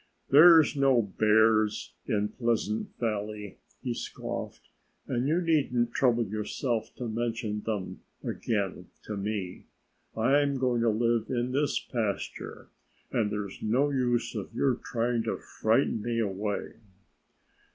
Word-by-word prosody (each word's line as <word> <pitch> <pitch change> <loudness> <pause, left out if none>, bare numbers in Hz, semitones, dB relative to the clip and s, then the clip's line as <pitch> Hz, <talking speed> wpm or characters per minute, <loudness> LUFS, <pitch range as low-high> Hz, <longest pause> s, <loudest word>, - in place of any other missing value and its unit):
"There 165 +4 +9
are 160 - +6
no 135 -4 +4 0.2
bears 110 0 +3
in 105 0 0
Pleasant 115 -3 -1
Valley," 105 -3 -3 0.2
he 125 -3 -1
scoffed. - - -6 0.4
"And 125 0 -1
you 165 +4 +2
needn't 135 -8 +1
trouble 120 -3 +2
yourself 110 +3 -2
to 125 - -5
mention 115 -2 -2
them 105 -4 -3 0.2
again 100 -5 -2 0.2
to 105 - -5
me. 100 -2 -4 0.5
I'm 140 +4 +3
going 125 -2 +1
to 115 - +3
live 115 +1 +1
in 125 0 -1
this 145 +2 +1
pasture 110 -5 -4 0.4
and 105 -3 +1
there's 100 -2 -5
no 130 +7 +2
use 125 -3 0
of 105 -4 -5
your 135 -2 +2
trying 120 0 -1
to 110 - -1
frighten 110 0 0
me 115 +1 -2
away." 105 -1 -2
115 Hz, 130 wpm, -28 LUFS, 105-125 Hz, 0.5 s, There